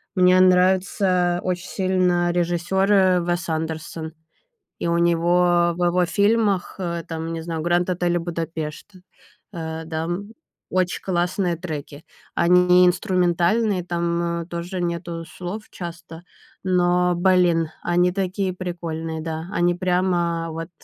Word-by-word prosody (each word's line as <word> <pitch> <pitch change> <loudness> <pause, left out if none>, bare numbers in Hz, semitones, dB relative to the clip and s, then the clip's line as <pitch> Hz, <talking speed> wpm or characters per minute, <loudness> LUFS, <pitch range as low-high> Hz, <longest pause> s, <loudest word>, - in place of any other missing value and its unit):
мне 185 0 +5
нравится 185 -1 +3
очень 180 0 -3
сильно 180 -2 +1
режиссёр 175 +3 0 0.3
Уэс 175 -1 -2
Андерсон. 160 0 -4 0.7
И 170 - -1
у 170 - +1
него 175 +1 +3
в 180 - 0
его 180 +1 +2
фильмах, 205 +1 +1
э, 170 -2 -3
там, 165 0 -4
не 165 -1 -4
знаю, 165 -1 -4
"Гранд 175 +2 +1
Отель 175 -1 0
Будапешт", 165 -1 -5 0.6
э, 160 -2 -5
да, 160 0 -3
м, 190 +6 -4 0.4
очень 185 -1 0
классные 180 0 0
треки. 155 -3 -7 0.3
Они 180 +1 +5
инструментальные, 180 +2 +1
там, 170 -1 -1
э, - - -10
тоже 175 +1 -5
нету 170 -1 -3
слов 180 +5 -7
часто, 170 -1 -8 0.4
но, 180 -1 +2
блин, 175 -3 +3
они 175 +1 +2
такие 190 0 -1
прикольные! 165 -3 -5
Да. 160 0 -4
Они 175 +1 +2
прямо 175 -2 0
вот 165 +2 -6
175 Hz, 125 wpm, -22 LUFS, 170-180 Hz, 0.7 s, мне